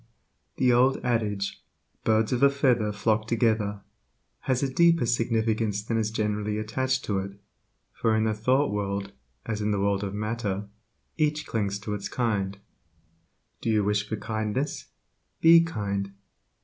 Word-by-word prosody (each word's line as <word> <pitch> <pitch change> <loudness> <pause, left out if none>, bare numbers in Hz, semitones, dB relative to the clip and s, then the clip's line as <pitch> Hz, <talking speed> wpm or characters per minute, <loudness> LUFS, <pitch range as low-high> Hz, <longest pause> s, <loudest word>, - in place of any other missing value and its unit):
The 125 -1 +4
old 130 +2 +4
adage, 105 -5 -1 0.4
"Birds 110 +1 +2
of 125 - 0
a 140 - +7
feather 125 -6 +2
flock 110 +1 0
together," 110 -3 +1 0.6
has 130 0 0
a 135 -1 -1
deeper 170 -2 +4
significance 110 -3 0
than 115 +1 -1
is 110 -1 0
generally 105 -1 -1
attached 130 +5 -1
to 100 -2 0
it, 100 +1 -7 0.5
for 110 -1 +1
in 110 - +2
the 110 -1 +1
thought 130 +6 +2
world 100 -1 -2 0.3
as 110 -2 -3
in 105 - 0
the 105 -1 0
world 100 0 +1
of 100 0 -4
matter, 105 -2 -3 0.5
each 150 -1 0
clings 100 -3 -1
to 105 0 -4
its 100 -1 -4
kind. 100 -5 -1 1.0
Do - - -2
you 110 -2 +3
wish 105 0 0
for 110 - -1
kindness? 110 +6 -3 0.5
Be 165 +1 +8
kind. 100 -10 -3
110 Hz, 150 wpm, -26 LUFS, 105-120 Hz, 1.0 s, Be